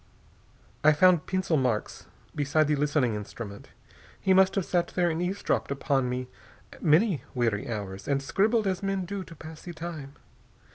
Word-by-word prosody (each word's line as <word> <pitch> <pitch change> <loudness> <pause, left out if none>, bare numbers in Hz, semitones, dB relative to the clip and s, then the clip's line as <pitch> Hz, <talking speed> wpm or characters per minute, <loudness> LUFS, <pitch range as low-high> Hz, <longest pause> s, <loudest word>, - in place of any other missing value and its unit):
I 155 0 +7
found 180 0 +4
pencil 185 -4 +1
marks 125 -5 -1 0.3
beside 150 +1 +2
the 150 - +2
listening 145 -4 +1
instrument. 105 0 -7 0.5
He 190 - +3
must 190 0 +5
have 195 -4 0
sat 175 -1 +1
there 175 -2 +1
and 160 +1 -2
eavesdropped 185 +3 -1
upon 135 -2 0
me 125 0 -3 0.5
many 160 - +3
weary 115 -4 0
hours, 100 -3 -5
and 140 -1 +2
scribbled 210 - +1
as 190 -2 -1
men 195 -2 -1
do 195 +1 -4
to 165 - -12
pass 160 0 -10
the 175 - -8
time. 155 -4 -7
155 Hz, 160 wpm, -28 LUFS, 130-185 Hz, 0.5 s, I